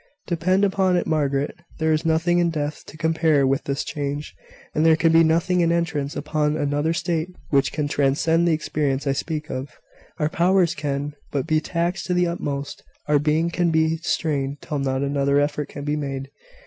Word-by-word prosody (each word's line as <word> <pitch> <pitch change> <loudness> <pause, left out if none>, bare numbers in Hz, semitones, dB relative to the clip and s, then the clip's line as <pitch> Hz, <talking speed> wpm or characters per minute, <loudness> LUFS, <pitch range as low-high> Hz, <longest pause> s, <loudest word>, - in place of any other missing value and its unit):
Depend 185 +3 +1
upon 190 -2 +2
it, - - 0
Margaret, 140 -2 0 0.2
there 160 -1 +2
is 155 +1 0
nothing 165 +2 +2
in 170 -1 +3
death 150 -2 -3
to 155 - -11
compare 160 -3 +2
with 135 +2 0
this 140 0 -1
change; 145 0 -4 0.4
and 155 - +1
there 160 0 +6
can 165 +1 +3
be 165 0 +6
nothing 170 +3 +2
in 170 0 +3
entrance 160 -4 -1
upon 150 0 0
another 145 +1 0
state 170 -1 -1 0.2
which 140 -2 +3
can 150 -2 -1
transcend 150 +4 +2
the - - +3
experience 145 -3 -1
I 140 - +2
speak 155 +3 -3
of. 130 +2 -4 0.5
Our 150 - +1
powers 180 0 +3
can 145 -2 -3 0.2
but 140 -2 -2
be 155 0 +2
taxed 175 +3 -2
to 180 - 0
the 180 0 +3
utmost. 145 -5 -4 0.3
Our 150 -1 +4
being 155 +3 +1
can 175 0 +1
but 165 - +1
be 160 0 +2
strained 145 -4 -1
till 150 -3 -3
not 135 0 -1
another 140 0 +2
effort 145 0 -1
can 145 - -7
be 150 0 0
made. 135 -2 -4
155 Hz, 195 wpm, -23 LUFS, 145-165 Hz, 0.5 s, there